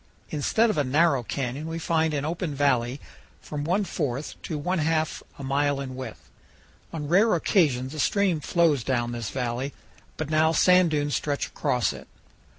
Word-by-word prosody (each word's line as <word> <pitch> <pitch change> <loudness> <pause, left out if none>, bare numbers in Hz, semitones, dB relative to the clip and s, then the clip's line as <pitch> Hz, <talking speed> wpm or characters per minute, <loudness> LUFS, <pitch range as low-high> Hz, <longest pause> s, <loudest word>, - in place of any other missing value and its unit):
Instead 220 +10 +2
of 155 - -1
a - - +3
narrow 140 +1 +3
canyon 135 +5 -4
we 165 0 -4
find 160 -1 +1
an 145 -1 -2
open 165 -1 -3
valley 130 -2 +1 0.4
from 145 -1 -5
one 180 +7 +1
fourth 145 -6 -3
to 155 - -4
one 180 +5 -1
half 155 0 0 0.2
a 140 - -8
mile 140 +1 +1
in 130 -2 -5
width. 130 -4 -8 0.6
On 150 -3 -4
rare 195 +6 +4
occasions 145 -7 +1
a 155 - -6
stream 190 0 +2
flows 155 -4 +2
down 120 -2 0
this 120 -3 -4
valley, 125 +2 -3 0.4
but 155 -1 -4
now 160 +1 +3
sand 180 +1 +5
dunes 145 -2 0
stretch 145 -1 -1
across 125 -2 0
it. - - -11
150 Hz, 170 wpm, -26 LUFS, 135-165 Hz, 0.6 s, sand